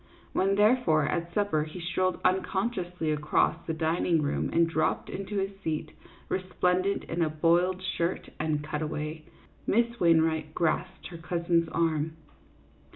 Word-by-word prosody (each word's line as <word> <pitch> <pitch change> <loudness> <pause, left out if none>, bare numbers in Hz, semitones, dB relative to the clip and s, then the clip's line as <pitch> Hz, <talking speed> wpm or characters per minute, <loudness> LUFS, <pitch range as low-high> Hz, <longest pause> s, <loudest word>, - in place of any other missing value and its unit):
When, 195 +1 +2
therefore, 210 -7 +4
at 170 0 -2
supper, 200 -5 +1
he 155 +3 -8
strolled 180 +2 0
unconsciously 185 -3 0
across 150 0 +2
the 160 - -1
dining 160 0 +1
room 145 - -1
and 170 0 +4
dropped 160 -1 0
into 195 +2 -4
his 195 0 0
seat, 155 -1 -2 0.4
resplendent 185 +1 0
in 170 +1 -3
a 160 - +2
boiled 175 +4 +2
shirt 175 -1 -2
and 150 -1 0
cutaway, 155 +1 -4 0.4
Miss 235 +2 +1
Wainwright 160 -2 +2
grasped 170 +2 -1
her 170 - -8
cousin's 170 0 0
arm. 160 -1 0
170 Hz, 135 wpm, -28 LUFS, 155-185 Hz, 0.4 s, therefore